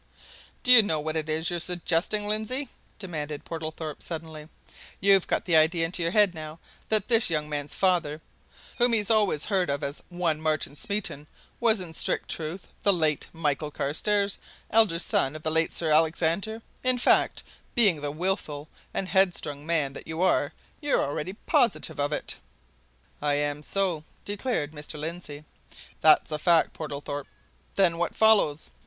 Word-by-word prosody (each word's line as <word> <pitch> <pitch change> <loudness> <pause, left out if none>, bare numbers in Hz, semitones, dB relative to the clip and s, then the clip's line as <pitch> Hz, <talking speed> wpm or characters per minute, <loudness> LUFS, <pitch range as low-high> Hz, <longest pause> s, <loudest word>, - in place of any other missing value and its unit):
"Do 250 - +3
you 245 -3 +10
know 160 -7 -1
what 155 +1 -3
it 155 -1 -2
is 160 +2 -1
you're 175 - -1
suggesting, 180 +4 0
Lindsey?" 220 +6 -1 0.3
demanded 155 -7 -5
Mr. - - -35
Portlethorpe, 160 -2 -5
suddenly. 160 -2 -7 0.5
"You've 195 -1 +4
got - - 0
the 175 -4 +2
idea 160 +1 +4
into 175 +2 -2
your 165 0 0
head 205 -2 +4
now 155 -1 -8 0.3
that 215 -2 +2
this 230 -4 +5
young 155 -2 -1
man's 145 -1 -3
father, 170 -5 +1 0.6
whom 240 0 +4
he's 215 -1 +1
always 205 -9 +2
heard 190 -6 0
of 140 0 -2
as 140 +1 -4
one 175 -3 -1
Martin 155 -2 0
Smeaton, 180 -5 -3 0.3
was 225 -3 +3
in 175 -3 -6
strict - - -1
truth 165 +4 -5 0.2
the 200 - +4
late 155 -5 +1
Michael 150 -2 -1
Carstairs, 200 +8 -1 0.3
elder 220 -6 +4
son 150 -4 +1
of 155 - -9
the 155 - -1
late 160 +1 +2
Sir 160 -2 -1
Alexander 165 +8 +1 0.2
in 255 -1 +2
fact, 245 - +2 0.3
being 200 -10 +4
the 145 - -2
wilful 155 -2 -3 0.3
and 190 - 0
headstrong 175 -7 +1
man 155 -5 +1
that - - -10
you 160 0 -5
are, 185 - +2 0.3
you're 290 -1 +2
already 150 +6 -4
positive 195 -7 0
of 145 +1 0
it?" - - -3 0.8
"I 145 -1 +1
am 145 0 -1
so!" 180 -1 -1 0.2
declared 205 - -2
Mr. 150 0 -8
Lindsey. 155 -2 -6 0.5
"That's 155 0 +5
a 150 - -2
fact, 170 0 +3
Portlethorpe." 145 -2 -5 0.5
"Then 175 -4 +3
what 175 - -1
follows?" 205 -9 +3
165 Hz, 165 wpm, -27 LUFS, 150-195 Hz, 0.8 s, you